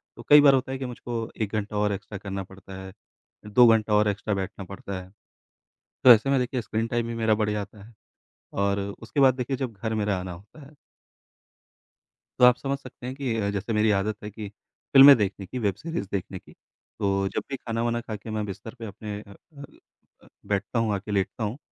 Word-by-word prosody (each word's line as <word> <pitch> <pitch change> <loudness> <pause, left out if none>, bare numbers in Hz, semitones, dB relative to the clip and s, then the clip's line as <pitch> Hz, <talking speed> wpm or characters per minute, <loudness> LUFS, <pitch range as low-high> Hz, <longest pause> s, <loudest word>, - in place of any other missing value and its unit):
तो - - -11
कई 145 0 +9
बार 140 -2 +7
होता 130 0 0
है 135 - -3
कि 130 - -5
मुझको 120 -2 -5
1 105 0 -2
घंटा 105 0 -2
और 105 0 +1
एक्स्ट्रा 100 +1 -7
करना 95 -1 -5
पड़ता 95 0 -13
है, 95 0 -10 0.5
2 120 +3 +6
घंटा 110 -1 +3
और 105 0 +4
एक्स्ट्रा 105 +1 -2
बैठना 95 +1 -4
पड़ता 100 0 -7
है। 90 - -14 1.0
तो 125 - +9
ऐसे 115 +5 +3
में 135 - +3
देखिए 125 -1 -2
स्क्रीन 110 +1 -2
टाइम 120 0 -1
भी 115 - -4
मेरा 110 -1 +2
बढ़ 105 -1 0
जाता 105 0 -5
है। 115 - -16 0.6
और 100 0 0 0.2
उसके 140 +5 -2
बाद 130 -2 +6
देखिए 130 +1 -2
जब 130 -3 -3
घर 110 +2 -3
मेरा 105 -2 0
आना 90 -1 -6
होता 105 - -14
है 145 - -16 1.7
तो 125 - +7
आप 125 -1 +7
समझ 140 0 -3
सकते 130 -2 -11
हैं 130 - -4
कि 130 -5 -2
अ, 100 -2 0
जैसे 100 +3 -3
मेरी 105 0 +3
आदत 105 +1 -2
है 105 - -5
कि 105 -1 -7 0.4
फ़िल्में 135 0 +10
देखने 100 -2 -2
की, 125 - -5
वेब 100 -5 0
सीरीज 130 - -5
देखने 95 -1 -3
की, - - -19
तो 100 -1 -3
जब - - -3
भी 135 - -2
खाना-वाना 120 0 -2
खा 110 -2 -6
के 110 +2 -10
मैं 110 -1 -2
बिस्तर 100 +4 -8
पे 115 - -6
अपने 105 0 -7
अ 100 - -15 0.3
अ - - -8 0.6
अ, - - -19 0.2
बैठता 100 +4 -1
हूँ, 110 -2 +1
आके 100 +2 -5
लेटता 100 +3 -1
हूँ। 110 +7 -4
110 Hz, 220 wpm, -26 LUFS, 100-120 Hz, 1.7 s, फ़िल्में